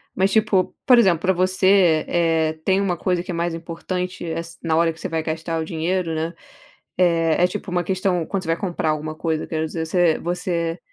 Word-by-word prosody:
Mas 190 +1 +2
tipo, 210 -4 +2
por 250 -2 +7
exemplo, 190 -8 +4
pra 190 0 +2
você, 185 -2 +3
eh 165 -2 +2
eh, - - -7
tem 190 +2 +2
uma 195 -3 0
coisa 180 0 0
que 185 - -6
é - - -3
mais 170 0 -1
importante, 180 +2 -5
eh, 165 - -3
as 170 0 -8
na 165 -2 +1
hora 165 0 +2
que 160 - -18
você - - -4
vai 160 -1 -1
gastar 160 +1 -3
o 160 - -2
dinheiro, 165 +1 -1
né. 160 +1 -2 0.7
Eh, 165 -2 +3
é - - +6
tipo 190 +1 -6
uma 175 0 0
questão. 185 -2 0
Quando 195 -2 -2
você 165 - -8
vai 165 - +2
comprar 175 -4 -2
alguma 155 0 -3
coisa, 160 0 -2
quero 160 -1 -2
dizer 160 +1 -4
você 175 -1 +2
você 170 -1 -2
170 Hz, 225 wpm, -22 LUFS, 165-185 Hz, 0.7 s, por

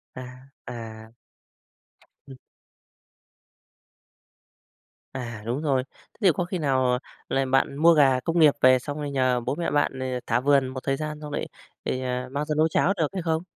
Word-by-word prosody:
À, 130 - -7 0.4
à. 110 -2 -8 1.2
Ừ. 135 - -10 2.8
À, 120 -4 -6
đúng 120 +5 -2
rồi, 135 -4 +1
thế - - -28
thì 190 -4 +6
có 175 - -2
khi 185 +1 -3
nào 130 -5 +1 0.3
là 135 0 +1
bạn 135 +1 +1
mua 165 +3 +6
gà 135 -4 +4
công 165 +5 -1
nghiệp 150 -3 +7
về, 130 0 +6
xong 145 +3 -6
rồi 145 -1 -4
nhờ 130 -2 +1
bố 120 - -2
mẹ 170 - -2
bạn, 145 -2 0
ờ, 130 - -3 0.2
thả 115 +1 +2
vườn 135 0 +3
một 130 0 -5
thời 135 0 0
gian, 150 0 -5
xong 150 -1 -7
lại - - -3 0.4
thì, 130 - -2
à, 125 0 -3
mang 145 +2 -2
ra 150 0 -2
nấu 155 +1 +4
cháo 175 +4 +2
được 160 -3 +1
hay 190 - -3
không? 165 -1 -1
135 Hz, 180 wpm, -25 LUFS, 130-155 Hz, 2.8 s, nghiệp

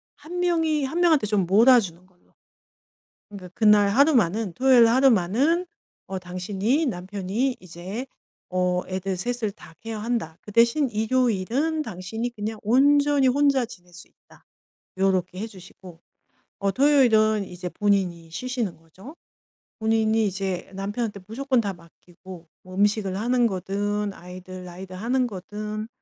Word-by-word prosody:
1 330 +5 -7
명이 325 -4 +1
1 320 +6 -3
명한테 315 -10 +3
좀 205 -3 +1
몰아주는 200 -3 +4
걸로. 180 -1 -31 1.0
그러니까 195 -3 -10
그날 210 -2 +5
하루만은 225 - +2
토요일 255 +3 +5
날 230 0 +4
하루만은 260 - +3 0.4
어 190 -1 -4
당신이 195 - -1
남편이 205 +4 -2
이제 185 +7 -7 0.4
어 180 0 0
애들 185 0 -3
3 245 +6 -3
을 215 - +1
다 165 - -16
케어한다. 225 -6 -3
그 210 - -11
대신 235 +6 +3
일요일은 245 +6 0
당신이 220 +2 -5
그냥 215 +1 -5
온전히 285 +4 +4
혼자 275 -1 +3
지낼 180 -5 -15
수 180 - -13
있다 - - -24 0.5
요렇게 185 -1 0
해 215 - -3
주시고 180 -4 -14 0.6
어 200 0 0
토요일은 220 -7 +4
이제 180 -1 -7
본인이 185 -5 0
쉬시는 240 +2 -3
거죠. 185 - -14 0.6
본인이 220 0 +2
이제 190 -2 -3
남편한테 205 +2 -4
무조건 255 +3 0
다 200 -2 -2
맡기고 175 0 -15
뭐 185 0 -12
음식을 205 -1 +1
하는 245 +2 +2
거든 205 +1 -2
아이들 185 0 -10
라이드 180 +1 -10
하는 245 +7 0
거거든 210 +1 -6
210 Hz, 295 characters per minute, -24 LUFS, 185-245 Hz, 1.0 s, 그날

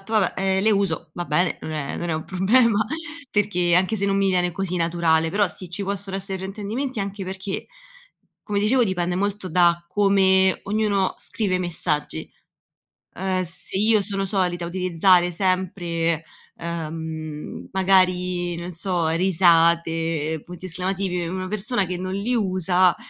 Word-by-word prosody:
fatto 195 +3 -10
vabbè, 210 -4 +3
ehm, 190 0 +1
le 220 - +5
uso, 195 -6 -1
va 175 - -4
bene, 175 +3 +1
non - - -6
è 150 -3 -4
non 175 - -4
è - - 0
un 155 - -4
problema, 215 +3 +3 0.5
perché 180 -4 +1
anche 185 +4 +3
se 200 - -1
non 195 0 +1
mi 195 0 +2
viene 180 -1 +1
così 180 +1 -3
naturale, 165 -1 +2
però 205 0 +2
sì, 185 -1 -8
ci 180 +4 -4
possono 195 0 -3
essere 195 0 -2
fraintendimenti, 210 +7 -4
anche 195 0 -4
perché, 190 +1 -4 0.8
come 205 -2 -2
dicevo 230 +5 +3
dipende 180 -2 -1
molto 200 -1 -2
da 170 0 +3
come 190 -2 +3
ognuno 205 -2 0
scrive 195 -5 0
i - - -2
messaggi, 165 -3 -1 0.9
ehm, 185 -1 -1
se 170 +2 -2
io 215 +1 +4
sono 195 0 -2
solita 180 -3 -1
utilizzare 180 0 +3
sempre, 170 -3 -1 0.3
ehm, 160 -2 -6
magari, 180 -2 +2
non 175 +1 -6
so, 170 -2 0
risate, 165 -3 +2
punti 180 +1 -10
esclamativi, 185 0 -2
una 185 +2 -4
persona 210 +1 0
che 180 0 -4
non 185 +1 -4
li 215 +5 -1
usa, 185 -3 +2
185 Hz, 155 wpm, -23 LUFS, 170-195 Hz, 0.9 s, le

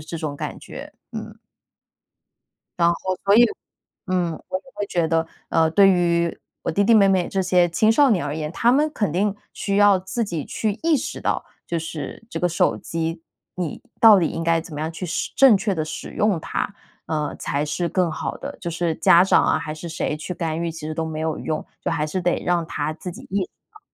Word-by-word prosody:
这 165 - -5
种 155 -3 -4
感 - - -5
觉， - - -10 0.2
嗯。 - - -7 1.4
然 170 0 +4
后 185 +2 -3
所 200 +1 +5
以， 240 +2 +8 0.6
嗯， 180 -3 0 0.2
我 185 - -1
也 - - -23
会 205 - -3
觉 170 -4 0
得， 165 0 +1 0.2
呃， 160 -1 +3
对 195 +2 +6
于 170 -2 +1 0.2
我 - - -1
弟 200 +5 +2
弟 230 +2 +5
妹 200 -2 +6
妹 185 -2 +2
这 190 -1 0
些 180 -1 +3
青 215 +7 +3
少 275 +3 +5
年 180 -8 +2
而 145 +2 -3
言， 150 -1 -3
他 235 +4 +3
们 300 +3 +3
肯 205 -8 -1
定 200 +3 +1 0.2
需 200 -1 -1
要 205 -2 +6
自 190 +6 -3
己 170 -7 -4
去 215 -2 -1
意 325 -2 +4
识 255 - -4
到， - - -1 0.2
就 170 - -1
是 160 +5 -6
这 - - -4
个 180 - +2
手 170 - +2
机 165 0 -4 0.3
你 175 -5 -4 0.2
到 220 -3 +9
底 170 - +2
应 165 - -4
该 165 0 +3
怎 160 - -12
么 150 - -4
样 160 +1 -2
去 180 - -6
使 170 - -3
正 265 -6 +7
确 200 0 -1
地 155 -2 -1
使 - - -6
用 210 -4 +1
它？ 200 - -3 0.3
呃， 150 -2 -2
才 145 +1 -1
是 170 +3 -2
更 180 -2 +1
好 155 - -4
的， 285 +1 -7
就 175 - -4
是 170 0 -1
家 170 - +6
长 190 - +4
啊， - - +3
还 155 -1 -5
是 170 +2 -7
谁 160 -2 -2
去 175 +4 -6
干 165 -1 -2
预， 170 -1 -2
其 165 - -9
实 155 - -3
都 160 - -2
没 155 -1 -4
有 160 -1 -1
用。 155 - -3 0.2
就 - - -3
还 150 - 0
是 185 +5 -2
得 175 0 0
让 175 -2 +1
他 150 -1 -2
自 175 +2 -7
己 - - -11
意 195 0 +1
识 - - -16 0.2
到。 425 - -17
175 Hz, 245 characters per minute, -22 LUFS, 160-195 Hz, 1.4 s, 到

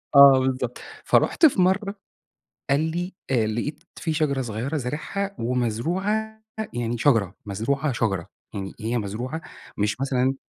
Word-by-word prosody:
آه 140 -1 +10
بالضبط. 130 -2 -1 0.3
فرُحت 330 - +4
في 245 -11 +5
مرّة 195 +3 +2 0.8
قال 140 +2 +4
لي: 175 +4 -2 0.2
"آآ 115 -4 +3
لقيت 120 +9 -3
في 160 - -2
شجرة 145 -4 +1
صغيرة 120 +6 -3
زارعها 155 +9 -3
ومزروعة 175 - -1 0.3
يعني 120 -1 -1
شجرة، 110 - +3
مزروعة 135 +8 -1
شجرة. 95 -7 -1 0.3
يعني 95 -1 -5
هي 115 +2 0
مزروعة 120 +9 -4 0.4
مش 105 +4 0
مثلًا" 135 -1 +1
130 Hz, 130 wpm, -24 LUFS, 115-160 Hz, 0.8 s, آه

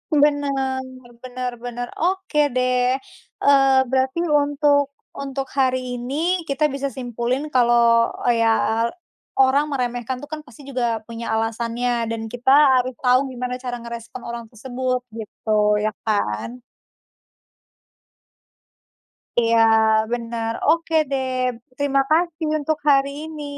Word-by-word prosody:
Benar 280 -3 +1 0.4
benar 250 0 -4
benar. 245 0 -5
Oke 355 -4 +1
deh, 250 0 +2 0.5
eee, 270 -1 +5
berarti 265 +3 +1
untuk 290 -2 +2 0.2
untuk 275 -1 -5
hari 255 -2 0
ini 250 +4 -5 0.3
kita 280 +2 -1
bisa 275 0 -2
simpulin 245 +1 -3
kalau 235 -2 +4 0.2
ya 230 0 +2 0.5
orang 270 +3 +4
meremehkan 245 -1 -2
tuh 290 - -9
kan 310 - -4
pasti 250 +3 -15
juga 235 -4 -1
punya 230 0 -7
alasannya 230 +1 -1
dan 230 -1 -3
kita 245 +1 -1 0.3
harus 255 +1 -2
tahu 250 0 +5
gimana 250 0 -4
cara 245 -1 -3
ngerespon 235 +1 -8
orang 235 -1 -6
tersebut 255 +2 -2 0.2
gitu, 220 0 -9 0.3
iya 215 - 0 0.2
kan? 210 - -1 2.8
Iya, 230 -1 +3 0.5
benar. 230 -1 -2 0.2
Oke 330 +1 +2 0.2
deh, 265 -1 -1 0.5
terima 275 -1 +2
kasih 330 0 +1
untuk 310 +1 -1
hari 275 0 +4 0.2
ini. 310 -2 -7
255 Hz, 115 wpm, -22 LUFS, 235-280 Hz, 2.8 s, eee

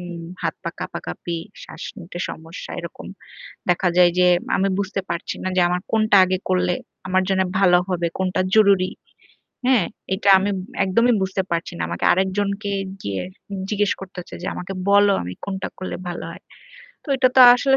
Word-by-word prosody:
উম 175 -1 -7 0.2
হাত, - - -1
পা - - -2
কাঁপাকাঁপি 165 - -5 0.2
শ্বাস - - -10 0.2
নিতে 175 -1 -8
সমস্যা 160 +2 -8
এরকম 170 -1 -8 0.6
দেখা 180 +1 +3
যায় 175 -1 +7
যে, 180 - +5 0.3
আমি 195 +1 +2
বুঝতে 195 0 -1
পারছি 170 0 -3
না 185 - 0
যে - - +5
আমার 180 0 0
কোনটা 215 -2 +4
আগে 185 0 0
করলে 180 -1 +2 0.3
আমার 185 0 +3
জন্য 190 -1 +2 0.2
ভালো 180 -2 +6
হবে, 175 -2 0
কোনটা 185 0 0
জরুরি। 200 -4 +5 0.8
হ্যাঁ, 250 -8 +4 0.3
এটা 200 +1 +1
আমি 200 +2 0 0.4
একদমই 230 +6 +3
বুঝতে 190 0 0
পারছি 170 0 -2
না। - - -4
আমাকে 85 0 -2
আরেকজনকে 200 +2 0 0.3
গিয়ে 100 -1 -3 0.5
জিজ্ঞেস 205 -1 +1
করতে 195 0 -10
হচ্ছে 175 - -9
যে, - - -4
"আমাকে 185 +2 -5 0.2
বলো 200 0 +6
আমি 90 - -5
কোনটা 190 -1 -3
করলে 185 - -5
ভালো 175 - -5
হয়?" - - -11 0.6
তো - - -14
এটা 255 0 +4
তো - - +8
আসলে 270 +2 +3
185 Hz, 170 wpm, -22 LUFS, 175-200 Hz, 0.8 s, তো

